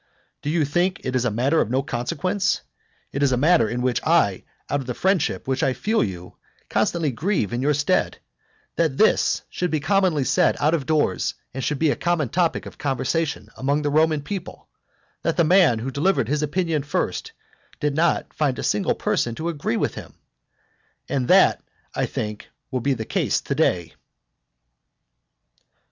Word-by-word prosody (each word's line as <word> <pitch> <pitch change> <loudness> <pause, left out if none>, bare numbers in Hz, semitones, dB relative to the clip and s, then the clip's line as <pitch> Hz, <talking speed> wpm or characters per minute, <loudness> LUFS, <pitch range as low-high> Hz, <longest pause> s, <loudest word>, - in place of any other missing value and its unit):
Do 145 - -3
you 160 -1 +2
think 175 +6 0
it 130 - -2
a - - +2
matter 130 +9 +2
of 110 - -1
no 130 +3 +1
consequence, 165 +13 -1 0.5
(it 140 - -3
is 140 -2 +3
a 125 - +2
matter 150 -4 +4
in 125 +1 -2
which 125 -1 +1
I, 155 - +2 0.2
out 145 - 0
of 130 - -7
the 125 - -3
friendship 190 -8 0
which 130 0 0
I 130 - +2
feel 215 - +1
you, 90 -3 -6 0.3
constantly 165 -5 +1
grieve 140 - -1
in 120 - -1
your 145 +2 +2
stead,) 145 +1 +1 0.6
that 160 -5 +1
this 220 - +3
should 180 - -2
be 155 - 0
commonly 185 -4 +2
said - - +2
out 150 +3 +2
of 150 -5 -1
doors, 155 -2 +1 0.2
and 135 0 -4
should 150 - -1
be 155 +1 +2
a - - 0
common 170 -7 0
topic 170 +1 0
of - - -11
conversation 145 +3 -1
among 140 +3 0
the 145 - 0
Roman 155 -1 +2
people, 190 +2 -7 0.5
that - - -1
the 170 - +5
man 175 -7 +5
who 125 +4 -4
delivered 140 - +1
his 150 +1 0
opinion 160 0 0
first 145 - -2 0.5
did 150 -1 0
not 165 +2 +1
find 140 -5 0
a - - -4
single 105 -1 +1
person 120 -1 -1
to 160 +5 -3
agree 145 -7 -2
with - - 0
him? - - -10 0.9
And 130 -3 -1
that - - +5 0.3
I - - -1
think 105 -1 -5 0.2
will 130 - -1
be 135 +2 +1
the 110 -2 -5
case - - 0
to - - -3
day. 85 -3 0
145 Hz, 180 wpm, -23 LUFS, 130-165 Hz, 0.9 s, the